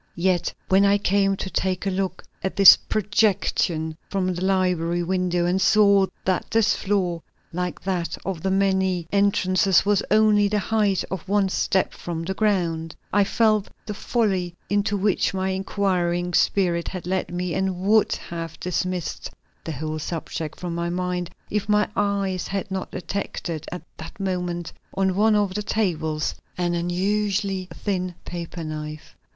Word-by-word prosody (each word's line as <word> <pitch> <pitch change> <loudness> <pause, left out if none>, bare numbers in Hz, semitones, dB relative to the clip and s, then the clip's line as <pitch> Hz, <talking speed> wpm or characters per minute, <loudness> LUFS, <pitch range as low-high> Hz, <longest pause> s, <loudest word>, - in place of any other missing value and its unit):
Yet 180 0 +1 0.2
when 190 +1 +4
I 200 0 +5
came 195 0 +2
to 190 - -4
take 185 0 -1
a 195 - +1
look 190 0 -2 0.2
at 190 - -2
this 195 -1 +10
projection 195 -6 0
from 185 -2 0
the 175 +1 -4
library 180 -3 +1
window 180 -1 0
and 180 +2 +1
saw 200 -1 +5 0.2
that 185 -1 0
this 225 -1 +3
floor, 185 -4 -1 0.3
like 180 0 -3
that 180 -3 -2
of 190 -4 -3
the 190 - 0
many 190 -3 +1
entrances, 195 -2 +3
was 205 -1 +3
only 210 -1 +4
the 210 +1 0
height 205 -2 +1
of 190 -1 -5
one 200 -1 +2
step 190 0 +1
from 165 -1 -5
the 190 +3 -2
ground, 170 -6 0 0.2
I 205 0 +5
felt 215 0 +2 0.2
the 210 - -4
folly 195 -6 -1 0.2
into 205 0 +1
which 195 -1 +1
my 190 0 0
inquiring 180 -2 0
spirit 175 -2 +2
had 185 -3 -5
led 185 +1 -1
me, 180 -1 -2
and 190 -1 -1
would 215 +3 +3 0.2
have 165 -2 -5
dismissed 180 -1 -2 0.4
the 160 - -3
whole 155 +2 -4
subject 160 -1 -5
from 175 -2 -4
my 170 0 -2
mind 180 0 -2 0.2
if 210 0 -1
my 210 0 +3
eyes 195 -3 0
had 195 0 -3
not 190 0 -3
detected 180 -4 -4
at 180 - -6
that 160 +5 -10
moment 180 -3 -2 0.2
on 190 -1 +2
one 215 +2 +4
of 205 -2 +1
the 210 - -2
tables 160 -8 -1 0.2
an 175 -1 0
unusually 195 +2 0
thin 185 -1 -3
paper 170 -1 -6
knife. 155 -1 -7
185 Hz, 155 wpm, -24 LUFS, 175-200 Hz, 0.4 s, this